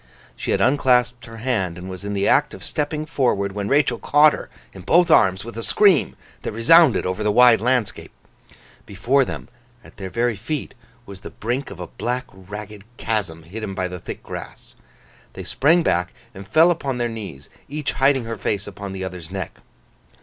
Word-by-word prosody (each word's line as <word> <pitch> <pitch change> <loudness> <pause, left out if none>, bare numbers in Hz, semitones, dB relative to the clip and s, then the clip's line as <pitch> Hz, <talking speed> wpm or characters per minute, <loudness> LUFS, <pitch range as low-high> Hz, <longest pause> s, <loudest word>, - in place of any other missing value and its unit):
She - - -6
had - - +1
unclasped 125 -3 +2
her 115 0 -10
hand, 110 -8 -1
and 90 +1 -8
was 95 0 -8
in 100 0 -4
the 100 0 +1
act 150 +2 +3
of - - -12
stepping 150 +1 -3
forward, 120 -10 0
when 100 0 -4
Rachael 140 +3 +2
caught 150 +1 +5
her - - -7 0.2
in 95 - -10
both 170 - +3
arms 95 -6 +4
with 115 - -8
a - - -3
scream 195 - +3 0.3
that - - -4
resounded 125 - +5
over 95 +3 -2
the 105 - +2
wide 120 -1 +6
landscape. 125 -3 -1 0.8
Before 120 +8 +2
them, - - -6 0.4
at - - -17
their 95 -1 -6
very 120 +3 0
feet, 140 +9 -4 0.3
was 100 -3 -11
the - - -8
brink 125 +5 -3
of 100 - -10
a 90 - -5
black 125 +7 -3
ragged 100 +2 -9
chasm 95 -8 -2
hidden 100 +3 -6
by 95 -1 -1
the 90 0 -7
thick - - -8
grass. - - -9 0.6
They - - -7
sprang 165 +5 +3
back, 90 - 0 0.2
and 95 -1 -10
fell 165 - +5
upon 140 -6 -2
their 120 -1 0
knees, 100 -12 -8 0.2
each 150 +1 -3
hiding 135 -2 +2
her 115 0 -5
face 100 +1 -2
upon 100 -1 -7
the 95 0 -5
other's 90 -3 -7
neck. 95 -1 -6
115 Hz, 190 wpm, -22 LUFS, 95-135 Hz, 0.8 s, wide